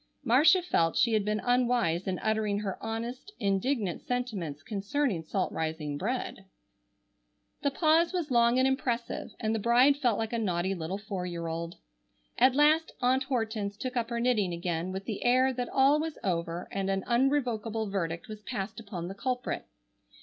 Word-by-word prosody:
Marcia 300 +9 +5
felt 165 - +1
she 235 - +3
had 215 -2 +2
been 210 +1 0
unwise 245 -9 +1
in 185 -1 -1
uttering 215 -2 +1
her 195 -3 -4
honest, 235 - -5
indignant 200 - 0
sentiments 200 - -3
concerning 205 - -1
salt 185 +4 -2
rising 155 -2 -3
bread. 200 - -3 1.2
The 285 - +2
pause 320 +3 +3
was 345 -6 -2
long 235 0 +4
and 260 +1 +4
impressive, 250 -3 -2
and 220 0 0
the 225 - 0
bride 245 +6 +5
felt 245 -7 +1
like 225 +1 -3
a 235 - 0
naughty 185 -3 0
little 175 +1 -4
four 195 -3 -5
year 170 -1 -4
old. 165 +1 -4 0.6
At 255 +1 +5
last 305 +3 +4
Aunt 260 +1 +2
Hortense 220 -6 -2
took 255 +2 -4
up 235 -2 -1
her 235 -1 -2
knitting 220 -7 +1
again 170 +1 -2
with 190 +1 -5
the 215 -3 -4
air 255 +2 +4
that 245 -1 -3
all 275 +3 +4
was 320 0 -3
over 170 -3 -2
and 195 0 -2
an 195 -1 0
unrevokable 235 -4 0
verdict 170 -4 -2
was 215 -1 -8
passed 200 0 -5
upon 195 -6 -6
the 190 - -5
culprit. 250 +4 -3
225 Hz, 170 wpm, -29 LUFS, 190-255 Hz, 1.2 s, Marcia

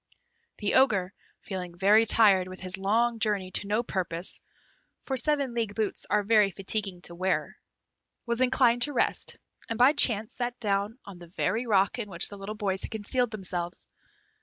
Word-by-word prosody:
The 205 - -2
Ogre, 200 -8 +3 0.3
feeling 180 -3 -6
very 210 +4 +4
tired 200 -5 +5
with 185 0 -9
his 185 0 -3
long 225 +4 +1
journey 205 -4 -1
to 200 - -3
no 215 +3 0
purpose 180 -4 -3 0.6
(for 270 - -3
seven 280 -1 +1
league 225 -4 -2
boots 215 -2 -3
are 210 0 +2
very 210 -1 +4
fatiguing 195 -1 -3
to - - -7
the - - -10
wearer), 185 +1 -1 0.7
was 235 +1 -2
inclined 250 -2 +3
to 290 +4 +2
rest, - - -1 0.3
and 230 - -3
by 255 +4 +6
chance 225 -7 +3
sat 245 0 -4
down 205 +1 -1
on 195 -3 -11
the 175 - -12
very 225 +7 -2
rock 200 +2 +2
in 210 -3 -5
which 170 -2 +2
the 205 - -9
little 200 +2 -6
boys 195 -2 -2
had - - -5
concealed 240 +3 -1
themselves. 180 -5 -5
210 Hz, 180 wpm, -27 LUFS, 190-235 Hz, 0.7 s, by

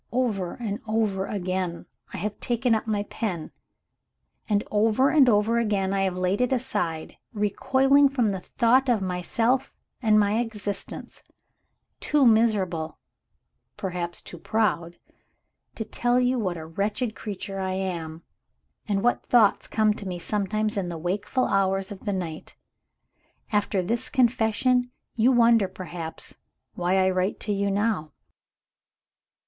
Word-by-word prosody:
Over 220 -8 -1
and 215 -4 -4
over 215 -3 0
again, 185 -3 -3 0.3
I - - -6
have 205 +3 -4
taken 240 0 +1
up 220 +1 -1
my 210 -2 0
pen; 190 -7 -4 1.0
and 205 -1 +2
over 220 +5 +3
and 280 -5 +6
over 220 +2 +3
again, 200 -4 0
I 195 - +1
have 190 -2 0
laid 185 +4 0
it 250 - +1
aside, 180 -11 -2 0.2
recoiling 270 +7 +3
from 245 -6 +1
the 190 - -3
thought 250 +7 +2
of 220 -5 +2
myself 225 +8 0 0.3
and 215 -3 +4
my 205 +2 +2
existence; 210 -4 -5 0.8
too 295 -2 +2
miserable 200 -8 +2 0.8
(perhaps 175 -2 -4
too 175 - -10
proud) 175 -5 0 0.8
to 220 - -4
tell 245 +2 +1
you 250 0 +2
what 185 -5 -2
a 160 - -7
wretched 210 +7 -2
creature 195 -2 -6
I 190 -1 -2
am, 170 -4 -4 0.6
and 200 -1 0
what 245 - +2
thoughts 225 -5 +4
come 215 -1 +2
to 205 -1 -8
me 180 -1 -3
sometimes 210 +3 -1
in 185 -3 -1
the 170 - -5
wakeful 195 +9 -1
hours 195 0 +1
of 200 +1 -9
the 205 - 0
night. 170 -4 -5 0.9
"After 205 -2 +1
this 230 +6 -2
confession, 245 0 +2 0.3
you 235 +3 +4
wonder, 230 -4 +5
perhaps, 175 -3 -7 0.4
why 180 +2 0
I 190 0 +3
write 185 +2 -1
to 210 - -1
you 200 0 0
now. 200 -7 -1
205 Hz, 140 wpm, -25 LUFS, 185-230 Hz, 1.0 s, and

